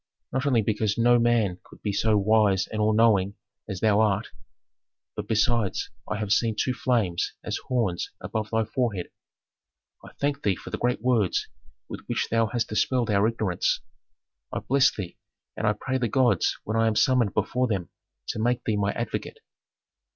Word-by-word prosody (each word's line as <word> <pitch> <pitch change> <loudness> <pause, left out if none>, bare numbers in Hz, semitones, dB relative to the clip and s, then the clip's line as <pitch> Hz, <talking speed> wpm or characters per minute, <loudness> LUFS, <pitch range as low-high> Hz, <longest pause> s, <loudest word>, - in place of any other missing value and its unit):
Not 130 +2 -1
only 120 -5 +3
because 105 0 0
no 120 +1 +5
man 115 -6 +2
could - - -18
be 105 - -1
so 110 +1 +2
wise 100 -2 +3
and 110 - -4
all 105 +1 +3
knowing 105 -3 +3 0.3
as 95 -3 -5
thou 110 -2 +4
art, 105 0 +1 0.9
but - - -5
besides 110 -1 +1 0.2
I 105 - -1
have 105 -2 -3
seen 115 -2 +1
two 130 - +1
flames, 115 -9 0
as - - -2
horns, 110 -9 0
above 110 -1 -4
thy 110 0 +1
forehead. 110 -5 -2 0.9
I - - -12
thank 140 0 -2
thee 100 -2 +1
for - - -10
the - - -3
great 125 +1 0
words 115 -7 +1 0.4
with - - -7
which - - -1
thou 115 0 +3
hast 115 +1 -2
dispelled 120 +1 +1
our 100 +1 +3
ignorance. 110 -6 0 0.7
I - - -3
bless 135 0 +3
thee, 90 -4 -7 0.4
and 110 - -1
I 105 - +4
pray 130 +5 -2
the 120 - 0
gods 120 -8 +2
when 110 +1 -2
I 115 0 +3
am 110 - +1
summoned 125 -3 +2
before 125 0 +1
them 95 -6 -3 0.4
to - - -3
make 120 +2 +1
thee 110 -2 0
my 100 0 0
advocate." - - -4
110 Hz, 180 wpm, -26 LUFS, 105-120 Hz, 0.9 s, no